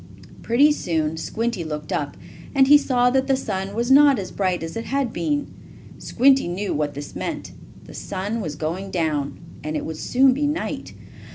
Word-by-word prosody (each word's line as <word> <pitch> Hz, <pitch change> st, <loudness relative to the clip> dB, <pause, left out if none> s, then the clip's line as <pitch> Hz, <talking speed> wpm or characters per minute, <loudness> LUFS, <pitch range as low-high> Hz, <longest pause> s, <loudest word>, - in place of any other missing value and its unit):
Pretty 275 Hz, +6 st, +4 dB
soon 160 Hz, -, -1 dB
Squinty 220 Hz, +4 st, -2 dB
looked 150 Hz, -1 st, -5 dB
up, 145 Hz, -1 st, -3 dB, 0.4 s
and 270 Hz, -1 st, +6 dB
he 290 Hz, +2 st, +7 dB
saw 250 Hz, -4 st, +3 dB
that 265 Hz, +1 st, +1 dB
the 270 Hz, -, +3 dB
sun 195 Hz, -6 st, -4 dB
was 240 Hz, +3 st, 0 dB
not 280 Hz, -1 st, +7 dB
as 195 Hz, -3 st, -5 dB
bright 185 Hz, -3 st, -1 dB
as 165 Hz, -, -6 dB
it 230 Hz, -, -4 dB
had 270 Hz, -4 st, -1 dB
been. 290 Hz, -2 st, -1 dB, 0.5 s
Squinty 270 Hz, 0 st, +3 dB
knew 190 Hz, +4 st, -2 dB
what 145 Hz, -1 st, -2 dB
this 145 Hz, 0 st, -8 dB
meant. -, -, -4 dB, 0.3 s
The -, -, -13 dB
sun 205 Hz, +4 st, -4 dB
was 155 Hz, -6 st, -4 dB
going 175 Hz, +6 st, -4 dB
down, 150 Hz, -6 st, -1 dB, 0.2 s
and 155 Hz, +1 st, -3 dB
it -, -, -4 dB
would 160 Hz, -1 st, -5 dB
soon 260 Hz, +1 st, +3 dB
be 290 Hz, +3 st, 0 dB
night. 300 Hz, +3 st, -4 dB
205 Hz, 185 wpm, -22 LUFS, 160-265 Hz, 0.5 s, he